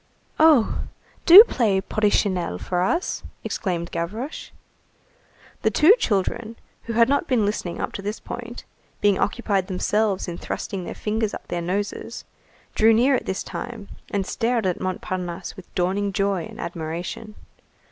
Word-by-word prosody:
"Oh! 310 -8 +4 0.4
Do 375 +5 +12
play 220 - +1
Porrichinelle 190 - 0
for 180 - -2
us!" 335 - 0 0.2
exclaimed 175 -3 -3
Gavroche. 215 - -4 1.1
The - - +3
two 320 +7 +6
children, 220 - -1 0.3
who 230 - -4
had 230 +1 +5
not 285 +5 +1
been 245 -6 +2
listening 195 -4 -3
up - - -3
to - - -5
this 210 +2 -4
point, 240 0 -8 0.4
being 205 -2 +3
occupied 200 -4 0
themselves 200 +1 0
in 175 -1 -5
thrusting 190 -4 -5
their - - -6
fingers 215 0 -2
up - - -10
their 175 - -2
noses, 200 +4 -4 0.5
drew 225 +1 +5
near 255 +5 +4
at 255 - -1
this 190 - -3
name, 235 -4 -6 0.2
and 200 -2 -1
stared 230 0 0
at 180 -2 -1
Montparnasse 185 -1 -4
with 190 -3 -13
dawning 195 +3 0
joy 195 -4 0
and - - -11
admiration. 170 +6 -5
205 Hz, 145 wpm, -23 LUFS, 185-230 Hz, 1.1 s, Do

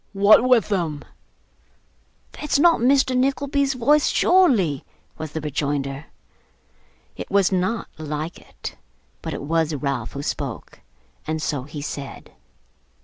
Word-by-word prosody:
'What 205 +3 +6
with 250 -4 +3
him?' 165 -7 -1 1.3
'That's 300 - -1
not 335 +3 +5
Mr. 260 +1 +3
Nickleby's 275 +1 +1
voice, 290 +5 +3
surely?' 235 - +3 0.4
was 155 -1 -5
the 160 - -3
rejoinder. 145 -1 -3 1.1
It - - -7
was 200 -1 +3
not 190 +5 -1
like 155 +1 -4
it; - - -9 0.4
but - - -4
it - - -6
was 160 +1 0
Ralph 135 -5 -3
who 140 - -5
spoke, 125 - -5 0.5
and 155 0 -1
so 145 -4 -2
he 145 0 -7
said. 140 -2 -7
165 Hz, 125 wpm, -22 LUFS, -, 1.3 s, What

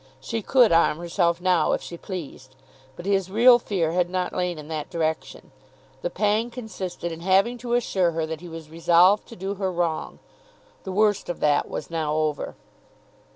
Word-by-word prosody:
She 220 +12 -4
could 245 +1 +4
arm 165 -2 +4
herself 170 0 0
now 180 -3 +2
if - - -1
she 170 - -7
pleased; 150 -8 -8 0.4
but 175 - -10
his 195 -2 +1
real 240 +4 +6
fear 180 -8 -1
had 175 0 +1
not 180 0 -2
lain 180 -2 -1
in 150 -1 -9
that 155 -2 -4
direction. 160 -2 -3 0.5
The - - -2
pang 215 - 0
consisted 190 -8 -6
in 165 - -7
having 195 +7 +2
to 240 0 -1
assure 190 -7 +1
her 160 0 -1
that 160 0 -6
he 175 - -9
was 165 -1 -9
resolved 175 +5 +4
to 230 - -11
do 195 +1 -4
her 190 -1 -2
wrong. 170 -2 -2 0.7
The 190 - -4
worst 205 0 +1
of 175 - -4
that 145 -1 +2
was 155 - -6
now 155 -2 -1
over. 155 -2 -1
180 Hz, 185 wpm, -24 LUFS, 165-200 Hz, 0.7 s, real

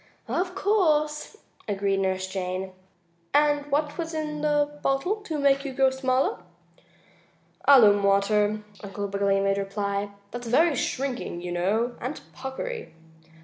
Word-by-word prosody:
"Of 360 +1 -1
course," 315 -4 +1 0.3
agreed 200 -1 0
Nurse 190 -1 0
Jane. 185 0 -4 0.6
"And 290 -1 +3
what 295 +2 0
was 330 -1 -3
in 300 -1 -3
the 295 -1 +1
bottle 275 +10 0
to 375 -7 -5
make 275 -1 +3
you 275 -2 -5
grow 265 0 +3
smaller?" 260 -4 0 1.3
"Alum 215 -8 +7
water," 205 +2 +2 0.2
Uncle 200 0 -4
Wiggily 200 0 +1
made 195 0 +1
reply. 200 0 -2 0.2
"That's 240 0 -6
very 310 +7 +4
shrinking, 250 -10 -3
you 180 - -4
know, 210 +8 0
and 255 +5 -4 0.2
puckery." 455 - -6
255 Hz, 130 wpm, -26 LUFS, 200-295 Hz, 1.3 s, Alum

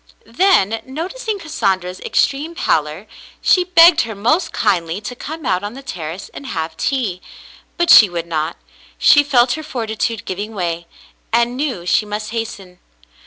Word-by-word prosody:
Then, 230 - +2
noticing 380 - -4
Cassandra's 190 - -2
extreme 300 +5 0
pallor, 155 - -1 0.3
she 365 - +3
begged 345 -2 +6
her 225 -2 -5
most 305 - +1
kindly 165 +1 0
to 245 +4 -7
come 310 +4 -7
out 185 +1 0
on 205 +3 -5
the 270 - -10
terrace 175 -4 -6
and 280 - -9
have 160 -8 -4
tea; 210 -6 -2 0.6
but 345 0 +3
she 210 - +9
would 170 -1 -4
not. 160 -1 -3 0.4
She 290 - +6
felt 255 -3 +3
her 315 - -4
fortitude 230 -6 -3
giving 205 +4 -5
way, 170 -2 -3 0.4
and 235 +1 +1
knew 255 - -3
she 210 +4 +1
must 210 +1 -5
hasten. 200 -6 -6
225 Hz, 155 wpm, -18 LUFS, 180-285 Hz, 0.6 s, she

